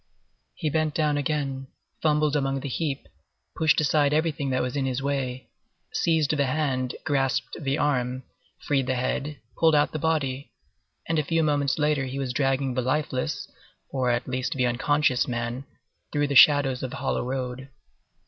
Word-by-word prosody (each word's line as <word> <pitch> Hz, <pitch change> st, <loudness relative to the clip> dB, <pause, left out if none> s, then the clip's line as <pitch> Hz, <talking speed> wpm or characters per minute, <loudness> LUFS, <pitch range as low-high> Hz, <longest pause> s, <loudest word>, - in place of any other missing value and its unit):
He 155 Hz, -, -2 dB
bent 155 Hz, 0 st, 0 dB
down 150 Hz, -2 st, +2 dB
again, 140 Hz, -2 st, -2 dB, 0.3 s
fumbled 150 Hz, -1 st, +2 dB
among 135 Hz, -1 st, 0 dB
the -, -, -4 dB
heap, 140 Hz, +1 st, -3 dB, 0.5 s
pushed 155 Hz, -2 st, +3 dB
aside 150 Hz, -1 st, +3 dB
everything 155 Hz, -3 st, 0 dB
that 130 Hz, 0 st, +1 dB
was 125 Hz, +1 st, -3 dB
in 135 Hz, -2 st, 0 dB
his 130 Hz, 0 st, -1 dB
way, 130 Hz, -2 st, -3 dB, 0.4 s
seized 160 Hz, -2 st, +2 dB
the 140 Hz, -2 st, +1 dB
hand, 130 Hz, -3 st, -1 dB
grasped 135 Hz, -4 st, 0 dB
the 140 Hz, -2 st, -1 dB
arm, 130 Hz, -3 st, 0 dB, 0.4 s
freed 135 Hz, -3 st, +1 dB
the 130 Hz, -, +1 dB
head, 140 Hz, +4 st, -2 dB, 0.2 s
pulled 160 Hz, -2 st, +5 dB
out 145 Hz, 0 st, +3 dB
the 155 Hz, -, -3 dB
body, 140 Hz, -4 st, -1 dB, 0.6 s
and 165 Hz, -1 st, +1 dB
a -, -, +1 dB
few 165 Hz, +3 st, +1 dB
moments 145 Hz, -3 st, +1 dB
later 150 Hz, -2 st, +1 dB
he 130 Hz, +1 st, -5 dB
was 135 Hz, -2 st, -2 dB
dragging 135 Hz, 0 st, +1 dB
the 130 Hz, -, 0 dB
lifeless, 130 Hz, 0 st, -1 dB, 0.4 s
or 130 Hz, -2 st, 0 dB
at 120 Hz, 0 st, 0 dB
least 130 Hz, +4 st, -2 dB
the 130 Hz, -3 st, +1 dB
unconscious, 130 Hz, +2 st, +2 dB
man, 120 Hz, +2 st, -3 dB, 0.5 s
through 145 Hz, -1 st, +1 dB
the 140 Hz, -1 st, -2 dB
shadows 135 Hz, -2 st, +6 dB
of 130 Hz, -, -4 dB
hollow 135 Hz, -, -1 dB
road. 130 Hz, +1 st, -4 dB
140 Hz, 165 wpm, -26 LUFS, 130-150 Hz, 0.6 s, shadows